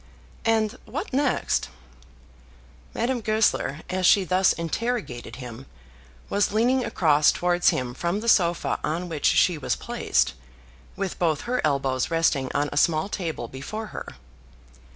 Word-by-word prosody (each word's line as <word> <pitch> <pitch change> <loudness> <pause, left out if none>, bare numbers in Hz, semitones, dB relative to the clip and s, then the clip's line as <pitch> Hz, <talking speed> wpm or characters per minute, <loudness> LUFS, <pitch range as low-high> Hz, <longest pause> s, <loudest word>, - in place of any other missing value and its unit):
"And 225 +1 +1
what 290 - -5
next?" 275 -1 0 1.3
Madame 245 +1 -1
Goesler, 215 -9 +1
as 185 0 +1
she 200 - +6
thus 185 +1 +3
interrogated 170 - -3
him, 125 0 -9 0.6
was 200 0 +1
leaning 245 +5 +2
across 155 -10 +3
towards 175 0 +2
him 125 -1 -2
from 175 +8 -2
the 230 - -6
sofa 175 -6 +2
on 175 +3 -2
which 155 -3 -4
she 175 -4 +3
was - - -1
placed, - - 0 0.6
with 195 -2 -4
both 160 -4 +1
her 250 +1 -1
elbows 135 -3 0
resting 160 -5 +1
on 145 - +1
a - - -4
small 155 +4 +2
table 165 - -4
before 175 - -6
her. - - -6
180 Hz, 135 wpm, -25 LUFS, 150-220 Hz, 1.3 s, she